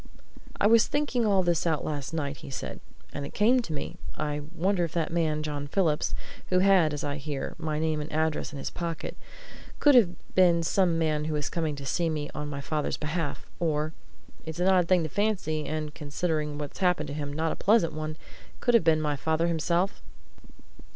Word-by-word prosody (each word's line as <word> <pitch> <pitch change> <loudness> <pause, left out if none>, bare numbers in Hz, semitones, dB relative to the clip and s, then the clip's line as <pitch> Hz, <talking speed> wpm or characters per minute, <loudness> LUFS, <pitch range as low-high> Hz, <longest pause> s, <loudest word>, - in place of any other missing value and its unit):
"I - - +3
was 225 +1 +6
thinking 285 -6 +1
all 195 -2 +4
this 175 -1 +1
out 160 -3 0
last 145 -2 -3
night," 145 -3 -2
he - - -10
said, 130 - -5 0.3
"and 145 - -4
it 140 - -8
came 235 +5 +4
to 200 - -7
me 150 - -4 0.2
I 150 -1 -2
wonder 180 +1 +1
if 165 - -3
that 165 -1 -1
man, 155 -3 +1
John 145 -1 -3
Phillips, 155 -2 +1 0.3
who 185 - +2
had, 185 -4 +5
as 145 +2 -4
I 145 0 -2
hear, 140 0 -4
my 155 -2 -2
name 155 -1 0
and 150 - -6
address 155 -1 0
in 145 - -7
his 135 - -4
pocket, 170 -2 -4 0.6
could 290 - +6
have 235 -8 +7 0.2
been 175 -2 +5
some 175 0 +2
man 155 -2 +1
who 155 -1 -1
was 150 -1 -2
coming 160 -4 -1
to 140 -1 -8
see 170 +3 +1
me 150 -2 -3
on 150 -1 -4
my 140 -1 -4
father's 150 +1 -1
behalf, 155 -1 -3
or 155 -2 0 0.5
it's 160 +1 -6
an 180 +2 +3
odd 180 -2 +4
thing 180 -2 +4
to - - -1
fancy, 185 -6 0
and, 155 -1 -3
considering 150 0 -2
what's 145 -1 -6
happened 180 -6 +2
him, 145 -1 -4
not 160 +2 0
a - - -2
pleasant 200 -6 +3
one! 155 0 -4 0.4
could 245 - +2
have 230 - +6
been 160 -1 +4
my 150 -1 0
father 160 +3 0
himself?" 170 +3 0
160 Hz, 205 wpm, -28 LUFS, 150-180 Hz, 0.6 s, have